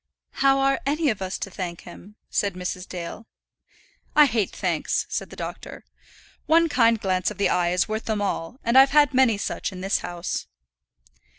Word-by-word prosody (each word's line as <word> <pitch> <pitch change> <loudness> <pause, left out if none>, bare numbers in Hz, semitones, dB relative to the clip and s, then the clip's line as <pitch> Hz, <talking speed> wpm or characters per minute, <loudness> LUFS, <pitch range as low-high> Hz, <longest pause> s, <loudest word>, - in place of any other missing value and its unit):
"How 270 0 +5
are 275 0 +1
any 295 0 +1
of 210 - -6
us 190 0 -3
to 195 - -6
thank 175 -2 -5
him?" 195 +4 -13 0.2
said 200 -3 0
Mrs. 180 0 -5
Dale. 180 +5 -7 0.9
"I 300 - +8
hate 225 -6 0
thanks," - - -1
said - - -3
the - - -11
doctor. - - -8 0.6
"One 330 +1 +4
kind 230 -4 +3
glance 185 -3 0
of 210 - -9
the 200 - +2
eye 175 -1 +1
is 180 +1 +1
worth 220 +1 -4
them 215 -2 -1
all, 200 +3 -3
and 235 +3 +5
I've 270 0 +7
had 290 -1 +5
many 255 -5 +4
such 205 - -3
in 185 -1 -8
this 195 +2 +1
house." 175 0 -4
210 Hz, 185 wpm, -24 LUFS, 185-265 Hz, 0.9 s, I